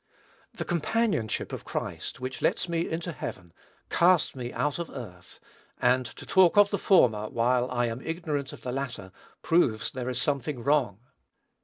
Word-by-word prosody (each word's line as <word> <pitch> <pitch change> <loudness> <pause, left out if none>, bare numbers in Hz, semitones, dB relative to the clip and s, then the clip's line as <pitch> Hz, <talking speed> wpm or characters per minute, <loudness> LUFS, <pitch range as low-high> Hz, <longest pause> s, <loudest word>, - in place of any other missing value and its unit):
The - - -4
companionship 175 - 0
of - - -5
Christ, - - -5
which 130 0 -5
lets - - +1
me 170 0 -1
into 170 +2 -3
heaven, 90 - -7 0.4
casts 175 -4 +4
me 125 -2 -5
out 145 +3 -1
of 170 - -4
earth; 90 -10 -10 0.4
and 125 0 +3
to - - -11
talk 190 -1 +4
of 205 0 +6
the 200 - 0
former, 110 - +4
while 125 +2 +1
I 120 -1 0
am 115 +2 -4
ignorant 155 -4 -3
of - - -11
the 125 - -4
latter, 125 -8 -4 0.3
proves 115 -10 +2
there 125 -1 -4
is 125 -1 -2
something 140 -2 -1
wrong. 125 -7 +1
130 Hz, 165 wpm, -28 LUFS, 120-165 Hz, 0.4 s, of